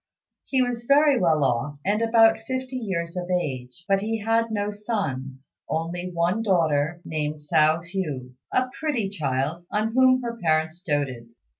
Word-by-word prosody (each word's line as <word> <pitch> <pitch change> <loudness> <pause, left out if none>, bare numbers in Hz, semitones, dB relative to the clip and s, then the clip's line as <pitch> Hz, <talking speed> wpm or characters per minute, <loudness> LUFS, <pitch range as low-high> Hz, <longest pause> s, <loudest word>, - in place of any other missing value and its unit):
He 260 -2 +2
was 240 -1 -3
very 285 0 +5
well 160 -5 +3
off, 140 +3 0
and 205 +3 +1
about 225 -1 +5
fifty 260 +3 -4
years 185 -8 -3
of 180 0 -4
age, 140 -3 -3
but 195 0 +3
he 225 +2 -1
had 225 +2 +1
no 205 -1 -1
sons; 145 - -4 0.2
only 175 +3 -2
one 175 +5 +1
daughter, 165 -5 +1
named 150 -1 -2
Hsiao 155 +2 +2
hui, 155 -9 -4 0.2
a 255 0 +1
pretty 265 -11 -1
child 150 -2 -2
on 215 +2 0
whom 255 0 +4
her 235 -1 -4
parents 160 0 +1
doted. 140 -9 -2
180 Hz, 155 wpm, -25 LUFS, 150-225 Hz, 0.2 s, very